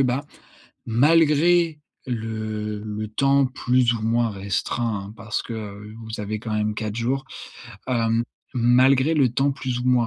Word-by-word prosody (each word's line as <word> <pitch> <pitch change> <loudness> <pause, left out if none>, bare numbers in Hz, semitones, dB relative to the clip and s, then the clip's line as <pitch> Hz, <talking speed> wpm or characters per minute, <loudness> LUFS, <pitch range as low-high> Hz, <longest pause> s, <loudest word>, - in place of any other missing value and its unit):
bah, 130 +2 +1 0.6
malgré 160 +5 +4 0.3
le-le 110 -2 -4
temps 135 +4 +3
plus 125 -2 +2
ou 115 - -4
moins 115 +1 +1
restreint, 100 +2 -2
hein, - - -9
parce 105 0 -3
que, - - -7
heu, 105 -1 -8
vous 110 -1 -6
avez 105 +1 -3
quand 110 0 -5
même 105 0 0
4 110 0 -4
jours. 130 +4 -1 0.6
Hem, 115 -2 +1 0.3
malgré 130 +4 +4
le 140 -5 +4
temps 135 +4 +1
plus 130 -2 -3
ou 125 - -4
moins 125 -2 +3
115 Hz, 150 wpm, -23 LUFS, 110-130 Hz, 0.6 s, malgré